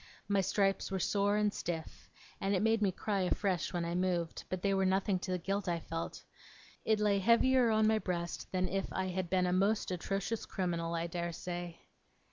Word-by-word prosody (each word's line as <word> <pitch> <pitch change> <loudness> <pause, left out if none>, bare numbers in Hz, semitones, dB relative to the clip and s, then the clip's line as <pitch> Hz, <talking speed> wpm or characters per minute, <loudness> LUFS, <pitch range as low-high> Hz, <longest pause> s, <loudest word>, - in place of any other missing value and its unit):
My 200 -1 +3
stripes 195 +1 +1
were 195 - -1
sore 200 +2 +1
and 210 -1 +2
stiff, 165 -2 -5 0.3
and 195 -1 +1
made 225 0 +3
me 200 -2 +3
cry 200 +2 -1
afresh, 185 -1 0
when 175 -2 -1
I 170 - -2
moved; 175 -2 -1
but 185 -1 -3
they 200 -1 +2
were 195 0 +2
nothing 190 0 +2
to 185 - -6
the 180 - +1
guilt 195 +3 -2
I 170 -1 0
felt. 165 0 -5 0.6
It 220 -1 +2
lay 205 -1 +3
heavier 235 +4 +4
on 220 0 +3
my 220 0 +3
breast 175 -3 -4
than 185 0 0
if 195 +1 -2
I 190 0 -1
had 185 -1 -2
been 185 0 +2
a 180 - +1
most 200 +2 +2
atrocious 195 +5 -2
criminal, 170 -3 -2
I 165 0 -1
dare 170 0 -3
say. 175 0 -6
190 Hz, 200 wpm, -33 LUFS, 175-200 Hz, 0.6 s, heavier